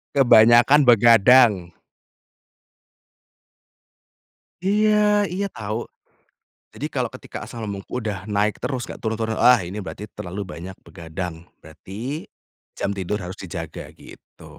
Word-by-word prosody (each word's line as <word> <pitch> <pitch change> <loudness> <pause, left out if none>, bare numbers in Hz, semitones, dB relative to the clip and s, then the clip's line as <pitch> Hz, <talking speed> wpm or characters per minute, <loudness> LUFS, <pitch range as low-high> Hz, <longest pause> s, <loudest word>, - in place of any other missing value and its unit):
Kebanyakan 120 +2 +6
begadang. 115 -5 +5 2.9
Iya, 210 +1 +2
iya 200 +2 -2
tau. 105 0 -5 1.0
Jadi - - -5
kalau - - -1
ketika - - -10
asam 115 -1 -8
lambung 100 -2 -6
udah 105 -5 -5
naik 105 +1 0
terus, 130 -3 -3
enggak - - -9
turun 110 -1 -2
turun, 110 -1 -3
ah, 125 0 +6
ini 90 +4 -7
berarti 100 +2 -8
terlalu 95 +3 -7
banyak 90 +4 -9
begadang, 85 +1 -7 0.3
berarti 105 - -8 0.5
jam 100 - -2
tidur 100 +1 -3
harus 95 0 -8
dijaga 85 -3 -7
gitu. - - -16
110 Hz, 115 wpm, -22 LUFS, 95-125 Hz, 2.9 s, Kebanyakan